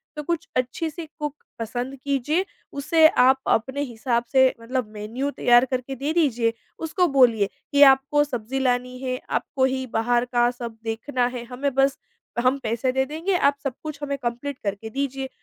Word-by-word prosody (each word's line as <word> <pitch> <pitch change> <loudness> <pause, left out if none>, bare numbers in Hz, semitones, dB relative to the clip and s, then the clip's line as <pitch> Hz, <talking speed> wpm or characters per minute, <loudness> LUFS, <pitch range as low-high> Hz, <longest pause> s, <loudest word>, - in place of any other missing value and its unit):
तो 300 - -5
कुछ 335 0 -2
अच्छी-सी 305 +6 -2
कुक 295 -1 -3 0.2
पसंद 245 +4 -4
कीजिए, 285 +6 0 0.3
उसे 315 +3 +5
आप 260 +1 +4
अपने 265 +5 +1
हिसाब 235 -2 -1
से 265 - +5 0.2
मतलब 250 -1 -2
मेन्यू 225 +7 -3
तैयार 245 -2 +4
करके 255 +1 -3
दे 280 +4 -2
दीजिए। 245 -9 +2 0.3
उसको 345 +3 +1
बोलिए 240 -8 +4 0.2
कि 285 - +3
आपको 275 +2 +2
सब्ज़ी 260 -1 -4
लानी 250 -1 0
है, 255 -1 -3
आपको 260 -2 0
ही 260 0 -1
बाहर 240 +2 +2
का 240 -1 +2
सब 235 -2 -7
देखना 235 +3 -1
है, 240 - -5
हमें 255 +3 -3
बस 270 0 +3 0.5
हम 255 +2 +3
पैसे 235 +3 0
दे 265 +1 +1
देंगे, 325 +7 -2
आप 280 -4 +3
सब 275 -3 -2
कुछ 305 -2 -6
हमें 280 -1 -2
कम्पलीट 250 +2 -4
करके 205 +2 -3
दीजिए। 270 +1 -3
260 Hz, 170 wpm, -24 LUFS, 240-280 Hz, 0.5 s, उसे